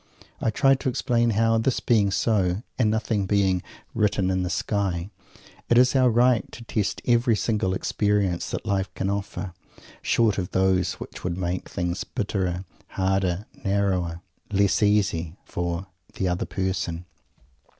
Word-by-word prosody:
I - - +2
try 135 +5 +4
to 130 0 -1
explain 120 -1 +1
how, 115 0 +3
this 120 +3 +1
being 105 -4 +3
so, 95 -1 +1 0.2
and 110 -4 +4
nothing 110 -2 0
being 95 -2 +2 0.3
"written 100 -4 +1
in 95 0 0
the 90 - -1
sky" 95 -1 -1 0.6
it 120 - +4
is 125 +2 +5
our 130 -1 +5
right 120 0 +3
to 120 - -9
test 105 -3 -2
every 120 -1 +3
single 105 -4 0
experience 100 -3 0
that - - -4
life 100 -2 0
can 95 +1 -1
offer, 100 -2 -4 0.5
short 110 -4 +2
of 90 - -3
those 95 -1 +2
which - - -9
would 90 -1 -2
make 90 0 -3
things 90 +2 -2
bitterer, 95 -3 -2 0.2
harder, 95 0 0 0.2
narrower, 95 -4 0 0.3
less 100 +1 +2
easy, 100 -5 +1
for 85 +1 -3 0.3
"the 95 - -1
other 90 0 -1
person." 90 -2 -2
100 Hz, 150 wpm, -25 LUFS, 90-110 Hz, 0.6 s, is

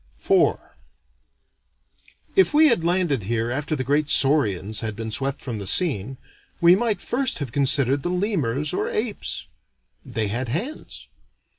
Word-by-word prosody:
IV 385 -1 +3 1.8
If 385 -6 +3
we 310 0 +6
had 230 -10 +1
landed 170 - 0
here 115 +2 -2
after 145 +4 -2
the 130 - -3
great 145 +3 0
saurians 110 - +3
had 110 -2 -4
been 110 0 -6
swept 135 +5 -2
from 115 -5 -5
the 100 - -6
scene, 135 - +2 0.4
we 170 0 +6
might 220 0 -1
first 260 +2 -1
have 140 -5 -5
considered 140 0 +2
the 175 - -3
lemurs 160 - -1
or - - -2
apes. 215 -1 -3 0.6
They 110 -2 -3
had 120 +3 -3
hands. 210 - -6
140 Hz, 145 wpm, -22 LUFS, 115-180 Hz, 1.8 s, we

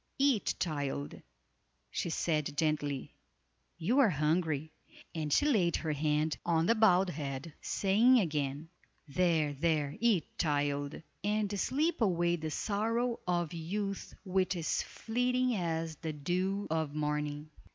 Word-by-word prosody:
"Eat, 270 -7 +2
child," 145 -4 -3 0.7
she - - -2
said 150 -3 -1
gently, 145 -3 -1 0.6
"you 210 - +2
are 260 -6 +6
hungry," 155 -1 0 0.4
and 155 -2 -3
she 290 - +4
laid 195 - +3
her 160 - -2
hand 150 +1 0
on 165 -1 +2
the 230 - +5
bowed 195 -5 +4
head, 140 0 -5
saying 225 +6 +4
again: 150 -4 -2 0.4
"There! 155 -1 +2
there! 150 -1 0
eat, 220 -7 +1
child! 145 -2 0 0.2
and 205 -1 0
sleep 310 - 0
away 175 -4 +2
the 160 -2 -4
sorrow 230 +7 -1
of 175 -2 0
youth 195 +4 -4
which 190 0 +1
is 165 -3 0
fleeting 250 +2 0
as 165 -3 -2
the 160 0 -4
dew 185 +7 -1
of 160 -2 -1
morning." 150 0 -2
165 Hz, 130 wpm, -32 LUFS, 150-200 Hz, 0.7 s, are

